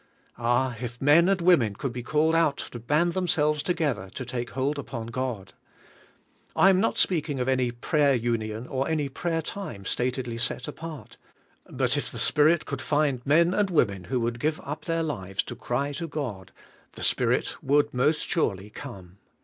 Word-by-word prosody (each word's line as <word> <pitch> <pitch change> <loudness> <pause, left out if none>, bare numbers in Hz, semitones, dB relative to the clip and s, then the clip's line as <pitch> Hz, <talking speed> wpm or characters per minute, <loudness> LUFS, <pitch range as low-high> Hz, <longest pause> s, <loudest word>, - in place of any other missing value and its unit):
Ah, 120 +1 +1
if 120 -1 -5
men 155 +6 +5
and 195 -2 +2
women 135 - +4
could 130 +3 -4
be 125 - -4
called 155 +5 +2
out 165 -4 +3
to 120 - -7
band 150 +8 +1
themselves 150 -5 +1
together 145 - -1
to 130 - -4
take 120 0 -4
hold 140 +3 -1
upon 120 -5 -5
God! 115 -5 -4 1.0
I 195 - +6
am 185 - +3
not 225 - +1
speaking 155 -6 +1
of 125 - -1
any 130 -2 +2
prayer 140 +4 +2
union 115 -1 -2
or 135 +1 -2
any 150 -3 0
prayer 165 +3 -2
time 150 - -6
statedly 125 -1 -2
set 125 +1 -2
apart, 160 -3 -8 0.5
but - - 0
if - - -2
the - - -7
Spirit 155 +2 +3
could 140 -1 -4
find 145 -4 +1
men 170 +5 +4
and 205 -1 +2
women 100 - +1
who 125 +4 -1
would 115 +1 -2
give 155 +4 0
up 150 +2 -6
their 165 -1 0
lives 95 - -2
to 120 - -7
cry 125 +4 -2
to 155 +4 -4
God, 115 - -5 0.4
the - - -8
Spirit - - +1
would 145 +2 +2
most 145 +5 +1
surely 105 - -1
come. 95 -2 -10
135 Hz, 180 wpm, -26 LUFS, 120-155 Hz, 1.0 s, I